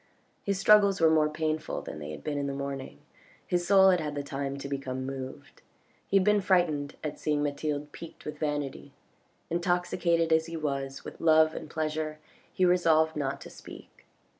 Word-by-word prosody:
His 200 -1 -1
struggles 200 -1 +5
were 165 -1 +5
more 155 -1 +4
painful 155 0 -2
than - - -7
they 75 0 -7
had 75 -1 -8
been 145 -1 -2
in 140 - -2
the 140 - -3
morning, 135 - -5 0.4
his 175 -1 -1
soul 190 -1 +7
had 180 - +2
had 150 -2 -4
the 145 - -3
time 140 0 -4
to 140 - -6
become 130 -2 -4
moved. 135 -1 -7 0.5
He 195 - +3
had 190 - +3
been 210 +1 +3
frightened 170 -7 +1
at 150 - -4
seeing 150 -1 0
Mathilde 145 0 -2
piqued 165 - -11
with 150 0 -6
vanity. 145 -3 -3 0.6
Intoxicated 175 -1 +1
as 160 0 +2
he 165 0 -5
was 135 -3 -3
with - - -9
love 160 -1 +5
and 155 - -7
pleasure 155 -1 -2 0.3
he 185 - +2
resolved 160 -3 +3
not 140 -2 -2
to - - -10
speak. - - -13
155 Hz, 185 wpm, -29 LUFS, 140-170 Hz, 0.6 s, soul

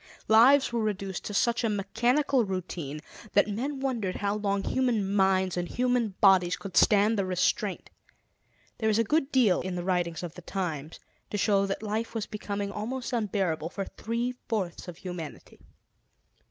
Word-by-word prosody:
Lives 240 +4 +6
were 235 - +1
reduced 195 -3 -3
to 205 - -4
such 235 +3 +2
a 225 - +2
mechanical 240 +7 +1
routine 170 -6 -4 0.3
that 205 - +4
men 260 +7 -3
wondered 235 -9 -2
how 200 0 -1
long 200 -2 -1
human 225 -7 0
minds 190 -2 +2
and 175 -1 -2
human 245 -4 0
bodies 190 -2 +5
could 195 -3 -9
stand 210 +1 +4
the - - +2
restraint. 185 -1 -1 0.9
There 220 -2 +1
is 215 - +2
a 230 - +4
good 300 +4 0
deal 235 -9 +4
in 185 0 -4
the 175 - -3
writings 175 -2 -1
of 170 -2 -5
the 180 - -11
times 165 -5 -4 0.3
to 205 - -3
show 200 -1 +2
that 195 +2 -3
life 220 +2 -3
was 220 -2 -1
becoming 205 -1 -4
almost 240 +5 -4
unbearable 190 -8 -1
for 195 +2 -4
three 235 +5 -3 0.2
fourths 190 -7 -2
of 175 -2 -8
humanity. 175 -5 -8
205 Hz, 165 wpm, -28 LUFS, 185-230 Hz, 0.9 s, Lives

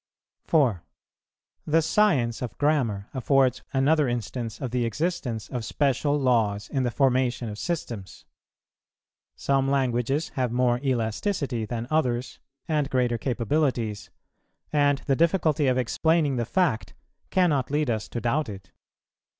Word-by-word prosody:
4. 125 - +2 0.8
The 160 +2 +4
science 140 - +2
of 125 - -5
grammar 125 -10 +1
affords 130 0 +2
another 145 +2 +3
instance 120 0 -4
of 130 -4 -4
the 125 -1 0
existence 120 - -2
of 125 -3 -4
special 145 +3 +1
laws 110 -6 +1
in 135 - 0
the 125 - +1
formation 125 -2 +1
of 105 0 -7
systems. 120 - -5 1.1
Some 135 -1 +1
languages 135 +2 0
have 125 -3 -2
more 120 0 +2
elasticity 130 - -1
than 115 +1 -4
others, 125 -5 0 0.3
and 150 -3 0
greater 125 -3 +1
capabilities; 120 -3 -1 0.6
and 145 -1 +3
the 135 - +2
difficulty 160 -2 +2
of 130 -1 +2
explaining 150 +4 +1
the 120 - 0
fact 160 -5 0 0.3
cannot 165 -8 +2
lead 145 -2 +1
us 110 -1 -2
to 120 - -4
doubt 125 +4 0
it. 95 -2 -10
130 Hz, 130 wpm, -26 LUFS, 120-145 Hz, 1.1 s, The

